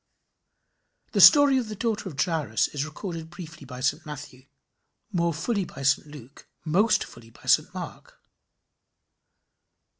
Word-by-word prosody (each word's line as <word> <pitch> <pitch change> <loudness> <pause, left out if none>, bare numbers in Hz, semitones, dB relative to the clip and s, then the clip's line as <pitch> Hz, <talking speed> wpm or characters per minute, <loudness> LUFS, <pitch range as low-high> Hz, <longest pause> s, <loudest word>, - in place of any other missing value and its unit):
The - - +2
story 285 -3 +8
of 240 - -4
the 215 - -6
daughter 215 -2 -2
of 140 -5 -11
Jairus 160 -10 0
is 145 0 -3
recorded 160 0 -7
briefly 170 -4 -11
by 125 -1 -9
St 150 +4 0
Matthew, 145 -4 -10 0.6
more 170 -3 +1
fully 200 +6 -1
by 140 - -9
St 140 +2 +2
Luke, 140 -3 -13 0.2
most 195 +8 +3
fully 115 - -14
by - - -20
St - - +3
Mark. - - -9
160 Hz, 140 wpm, -26 LUFS, 140-195 Hz, 0.6 s, story